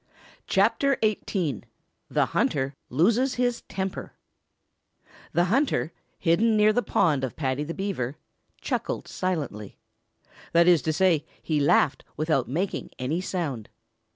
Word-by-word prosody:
CHAPTER 275 -1 +2
XVIII 185 - -1 0.5
THE - - +2
HUNTER 135 -1 0 0.2
LOSES 230 - +2
HIS 245 -1 0
TEMPER 190 -1 -4 1.2
The 175 - +3
hunter, 230 - +1 0.3
hidden 215 +6 +3
near 210 0 +5
the 245 - +2
pond 150 - +1
of 130 - -3
Paddy 135 -1 -1
the 165 +3 -5
Beaver, 165 -10 -3 0.4
chuckled - - -3
silently. 145 - -3 0.8
That 170 +1 +5
is 175 -4 +6
to 155 - 0
say, 170 -3 +3 0.2
he 155 -2 0
laughed 145 0 +3
without 155 -4 +1
making 180 +9 -2
any 145 +8 -1
sound. 155 - -3
170 Hz, 125 wpm, -26 LUFS, 145-200 Hz, 1.2 s, is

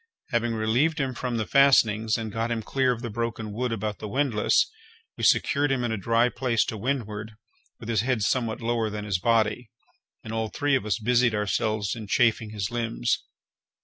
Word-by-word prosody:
Having 120 -1 0
relieved 125 +9 +1
him 135 -2 -1
from 120 -1 -3
the 110 - -1
fastenings, 115 -6 +4
and 110 -1 -5
got 115 +2 -2
him 115 -2 -2
clear 130 +2 +1
of 120 0 -4
the 120 - -3
broken 115 -1 -3
wood 120 +3 -2
about 105 -2 -3
the 105 - -5
windlass, 125 -2 +2 0.5
we - - -7
secured 145 0 +3
him 130 -2 0
in 120 - -1
a - - 0
dry 115 +4 +2
place 120 -2 0
to - - -4
windward, 110 -2 -3 0.5
with - - -9
his 110 -3 +1
head 120 -3 0
somewhat 115 0 0
lower 115 -1 0
than 105 0 -5
his 100 -3 -1
body, 115 +2 +1 0.5
and 110 - -7
all 110 0 -1
three 145 +5 -1
of 120 -5 -1
us 100 -4 +1
busied 120 0 +2
ourselves 105 +1 -1
in 110 -2 -8
chafing 115 0 +2
his 105 -1 -4
limbs. 115 - -1
115 Hz, 195 wpm, -26 LUFS, 110-125 Hz, 0.5 s, fastenings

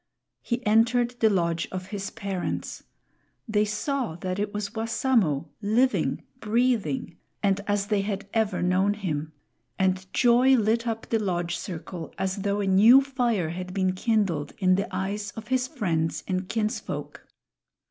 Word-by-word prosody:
He 240 +1 -3
entered 230 +3 +3
the 220 - +5
lodge 170 -4 0
of 185 0 -5
his 200 -1 -4
parents. 195 -3 -4 0.7
They 210 -1 +2
saw 215 - -2
that 185 +2 -4
it 205 0 -1
was 205 -1 -4
Wassamo, 220 - +1
living, 240 +6 +1 0.2
breathing 215 - 0 0.3
and 200 0 +2
as 205 -1 +1
they 205 -1 +1
had 200 0 -3
ever 215 -5 +1
known 190 +3 +2
him. 155 -7 -3 0.5
And 190 0 0
joy 250 +2 +5
lit 230 +2 +1
up 225 -1 -2
the 225 - +1
lodge 175 -4 -1
circle 170 -2 -7
as 190 0 -1
though 200 +1 -1
a - - -1
new 215 +8 +7
fire 240 - 0
had 180 +2 -6
been 185 -1 +1
kindled 190 -7 0
in 185 -2 +3
the 200 +3 +1
eyes 200 +2 -3
of 225 0 -8
his 260 -1 +1
friends 170 - -1
and 185 0 -2
kinsfolk. 220 +1 -3
205 Hz, 150 wpm, -26 LUFS, 185-225 Hz, 0.7 s, new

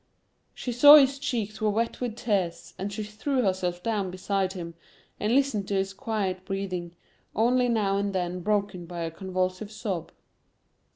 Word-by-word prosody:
She 250 - -4
saw 285 +5 +10
his 275 -2 +5
cheeks 225 -7 -3
were 215 - +3
wet 230 +4 -1
with 240 -3 -2
tears, 195 -8 -1
and 195 +2 -3
she 215 +1 -4
threw 245 +6 -1
herself 180 -3 -1
down 210 -4 -1
beside 190 +1 -1
him 170 -3 -6 0.5
and 215 +4 +1
listened 265 -8 +1
to 200 - -1
his 195 0 0
quiet 195 -5 -2
breathing, 185 -3 -4 0.4
only 245 +2 +3
now 205 -4 +1
and 200 0 0
then 180 -1 -2
broken 200 -2 -1
by 175 0 -6
a 165 -1 -2
convulsive 185 +3 -3
sob. 200 -6 -4
200 Hz, 165 wpm, -27 LUFS, 185-225 Hz, 0.5 s, saw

